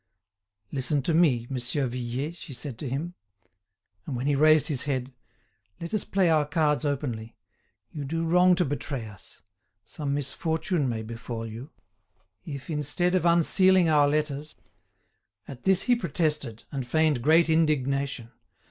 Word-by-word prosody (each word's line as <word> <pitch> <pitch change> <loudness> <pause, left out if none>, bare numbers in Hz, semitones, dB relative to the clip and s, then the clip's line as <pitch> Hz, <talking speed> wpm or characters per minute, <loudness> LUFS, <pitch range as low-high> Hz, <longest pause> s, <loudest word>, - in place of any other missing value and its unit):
"Listen 140 +1 -1
to 165 - 0
me, 145 -8 +3
Monsieur 130 +2 -1
Vuillet," 125 +6 -4
she 165 -4 -10
said 130 -2 -7
to 140 - -4
him. 155 +7 -3 0.9
And 135 - -3
when 125 +2 -3
he 145 - +2
raised 155 +1 +5
his 140 -5 -1
head: 130 -2 -2 0.7
"let 170 +3 -7
us 215 - 0
play 195 -2 +2
our 155 -2 +4
cards 150 0 +1
openly; 125 -6 -3 0.6
you 150 - -5
do 165 +4 -2
wrong 180 +2 +5
to 180 0 +1
betray 140 -3 -4
us; 100 -3 -15 0.4
some 145 -3 -3
misfortune 160 +2 -1
may 110 -2 -3
befall 115 0 -6
you. 115 +5 -8 0.7
If, 140 -4 -7
instead 155 +3 0
of 180 -2 +2
unsealing 180 +1 +4
our 145 -2 +4
letters—" 150 0 -2 0.9
At 130 -3 -10
this 190 -1 +4
he 245 - +3
protested, 150 - -2
and 135 -3 -4
feigned 155 -1 +2
great 160 +5 +4
indignation. 140 -6 0
145 Hz, 150 wpm, -26 LUFS, 130-165 Hz, 0.9 s, raised